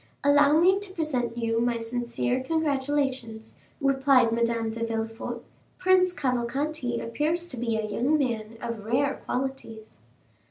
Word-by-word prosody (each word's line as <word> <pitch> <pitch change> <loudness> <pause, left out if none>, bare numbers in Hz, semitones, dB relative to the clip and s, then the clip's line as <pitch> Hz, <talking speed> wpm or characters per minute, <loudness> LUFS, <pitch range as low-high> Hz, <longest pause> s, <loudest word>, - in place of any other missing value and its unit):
"Allow 290 +1 +5
me 375 +3 +5
to 400 -2 -8
present 255 -9 -2
you 230 -1 0
my 240 0 +1
sincere 240 +2 -2
congratulations," 270 -6 -1 0.3
replied 270 -4 +4
Madame 230 -1 0
de 230 +1 -4
Villefort. 225 +1 -4 0.3
"Prince 370 0 +4
Cavalcanti 255 -2 -1
appears 305 +9 -1
to 255 - -6
be 230 -1 -1
a 220 - -1
young 250 +8 +1
man 230 -5 -2
of 230 -3 -4
rare 265 +6 0
qualities." 250 - -5
250 Hz, 130 wpm, -26 LUFS, 230-290 Hz, 0.3 s, Allow